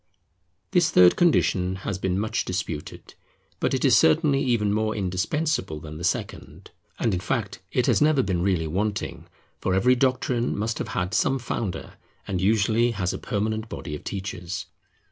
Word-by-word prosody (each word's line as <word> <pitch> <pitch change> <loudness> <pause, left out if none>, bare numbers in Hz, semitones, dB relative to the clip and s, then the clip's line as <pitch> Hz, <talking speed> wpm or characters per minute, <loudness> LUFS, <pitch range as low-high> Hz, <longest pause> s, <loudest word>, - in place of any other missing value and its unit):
This 175 -4 +3
third 90 - +6
condition 95 - +2
has 95 -2 -2
been 95 -1 -1
much 110 +2 -1
disputed; 90 -5 -5 0.5
but - - +1
it - - 0
is - - +6
certainly 135 - +4
even 115 -6 +1
more 110 0 0
indispensable 95 - -1
than 75 0 -9
the - - -7
second. - - -4 0.3
And 115 - 0
in 90 - 0
fact 105 0 -2
it 125 - +1
has - - +2
never 150 -3 +4
been 95 -3 -1
really 90 -3 +1
wanting, 100 +6 -3 0.3
for 95 - 0
every 125 +7 +4
doctrine 125 -2 0
must 110 +2 -2
have - - -3
had 90 0 -1
some 135 0 +2
founder, 115 -5 -4 0.3
and 90 -2 -2
usually 110 +3 +3
has 90 -4 -1
a - - -5
permanent 110 +2 -2
body 80 -2 -6
of - - -9
teachers. 95 -1 -5
105 Hz, 165 wpm, -25 LUFS, 90-120 Hz, 0.5 s, third